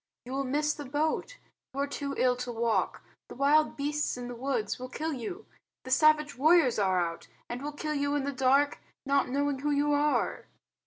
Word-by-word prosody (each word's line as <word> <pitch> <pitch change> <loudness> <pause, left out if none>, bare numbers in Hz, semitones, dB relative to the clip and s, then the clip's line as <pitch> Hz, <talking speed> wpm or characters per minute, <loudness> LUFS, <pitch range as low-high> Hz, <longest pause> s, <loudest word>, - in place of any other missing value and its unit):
You 250 - -8
will 275 +1 -1
miss 300 +3 +1
the 290 - -8
boat. 310 - -1 0.4
You - - -3
are - - +2
too 280 0 -4
ill 250 -1 +3
to 250 0 -4
walk. 230 -1 0 0.3
The - - -9
wild 290 +4 +3
beasts 295 -1 -1
in 245 0 -6
the - - -5
woods 240 -4 -2
will 255 0 -6
kill 315 +4 -3
you. 280 - -6 0.4
The 260 - -7
savage 300 +1 +4
warriors 295 -3 +4
are 190 -2 +2
out, 170 -1 -3 0.2
and 240 +1 -5
will 295 +1 -4
kill 305 +1 -4
you 285 0 0
in 290 - 0
the 280 - -2
dark 275 +2 +2 0.3
not 280 -1 +2
knowing 280 +1 0
who 295 +2 -1
you 290 0 +2
are." 295 +1 0
280 Hz, 205 wpm, -29 LUFS, 255-295 Hz, 0.4 s, savage